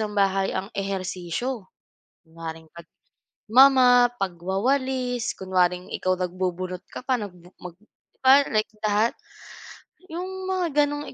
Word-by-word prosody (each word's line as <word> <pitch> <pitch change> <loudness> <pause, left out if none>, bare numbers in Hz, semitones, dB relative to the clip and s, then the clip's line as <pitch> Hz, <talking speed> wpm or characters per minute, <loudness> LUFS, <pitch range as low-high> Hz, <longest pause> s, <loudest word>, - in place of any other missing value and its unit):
ng 210 -1 -3
bahay 195 -1 +2
ang 195 +4 -4
ehersisyo. 195 +3 -4 0.5
Kunwaring, 160 -1 -9 0.6
pagmo-mop, 250 0 +5
pagwawalis, 245 +7 -1
kunwaring, 180 -1 +1
ikaw 185 0 0
nagbubunot 185 0 -3
ka 255 - -9
pa, 260 - +2
nag 210 -4 -5 0.3
mag 175 -2 -9 0.5
ba 275 +2 +8
like 215 -1 0
that. 215 +2 +2 1.0
'Yong 370 +3 -5
mga 370 -2 0 0.2
gano'ng 290 0 -5
200 Hz, 110 wpm, -24 LUFS, 185-255 Hz, 1.0 s, ba